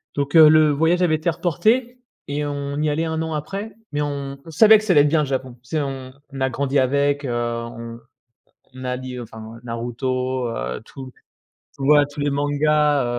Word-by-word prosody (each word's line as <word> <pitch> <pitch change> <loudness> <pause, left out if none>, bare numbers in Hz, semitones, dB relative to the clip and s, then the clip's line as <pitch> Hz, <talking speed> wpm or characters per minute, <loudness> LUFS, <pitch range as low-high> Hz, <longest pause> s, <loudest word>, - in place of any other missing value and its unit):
donc, 145 +2 -2
heu, 155 -2 +9
le 155 -1 +5
voyage 165 +5 +2
avait 170 -3 +3
été 155 +2 -1
reporté 230 - 0 0.3
et 145 +1 -2
on 140 0 -4
y 155 - +1
est - - +1
allé 160 +3 -1
1 160 0 -2
an 160 0 -3
après, 195 +8 -5 0.2
mais 145 - 0
on 140 -1 -4
on 165 - -10
savait 220 +7 +7
que 215 - -5
ça 215 - 0
allait 145 - +6
être 145 - +3
bien, 155 +2 +2
le - - 0
Japon! 130 -2 -3
Tu 125 - -21
sais, - - +1
on 135 -2 -6 0.3
a 130 0 +1
grandi 140 +2 0
avec, 140 +2 +1
heu, - - -3
on 115 0 -4 0.9
a 125 0 -2
lit 130 0 -7
enfin 110 0 -10
Naruto, 125 +2 -3
heu, 60 - -4
tout 130 +2 -10 0.7
ouais, 145 +2 +5
tous 145 - -7
les 145 0 0
mangas, 145 0 +2
145 Hz, 200 wpm, -21 LUFS, 130-155 Hz, 0.9 s, heu